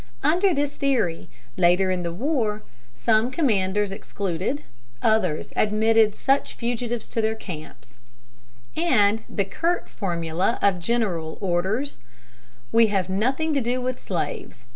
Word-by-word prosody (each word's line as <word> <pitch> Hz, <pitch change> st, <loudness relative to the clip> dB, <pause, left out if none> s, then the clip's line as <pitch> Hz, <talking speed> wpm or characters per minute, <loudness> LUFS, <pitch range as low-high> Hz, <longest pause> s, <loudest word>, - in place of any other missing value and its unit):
Under 365 Hz, +5 st, +3 dB
this 290 Hz, -2 st, -1 dB
theory, 220 Hz, -, 0 dB, 0.3 s
later 180 Hz, +2 st, +4 dB
in 180 Hz, -1 st, -1 dB
the 170 Hz, -1 st, -3 dB
war, 220 Hz, -, -1 dB, 0.3 s
some 225 Hz, +1 st, +2 dB
commanders 210 Hz, -, +1 dB
excluded, 195 Hz, -, -3 dB, 0.4 s
others 200 Hz, -8 st, +1 dB
admitted 215 Hz, 0 st, +3 dB
such 275 Hz, +1 st, +1 dB
fugitives 235 Hz, -1 st, -3 dB
to 225 Hz, -, -1 dB
their 220 Hz, 0 st, 0 dB
camps; 155 Hz, -, -10 dB, 0.8 s
and 220 Hz, -10 st, +3 dB
the 200 Hz, -, -1 dB
curt 335 Hz, -, -1 dB
formula 175 Hz, +1 st, -1 dB
of 195 Hz, -3 st, +2 dB
General 175 Hz, -6 st, -1 dB
Orders, 195 Hz, +9 st, -1 dB, 0.7 s
"We 230 Hz, 0 st, +5 dB
have 195 Hz, -3 st, 0 dB
nothing 265 Hz, +11 st, 0 dB
to 280 Hz, -, +2 dB
do 245 Hz, +2 st, 0 dB
with 255 Hz, 0 st, -3 dB
slaves. 420 Hz, -, -4 dB
215 Hz, 125 wpm, -24 LUFS, 185-255 Hz, 0.8 s, We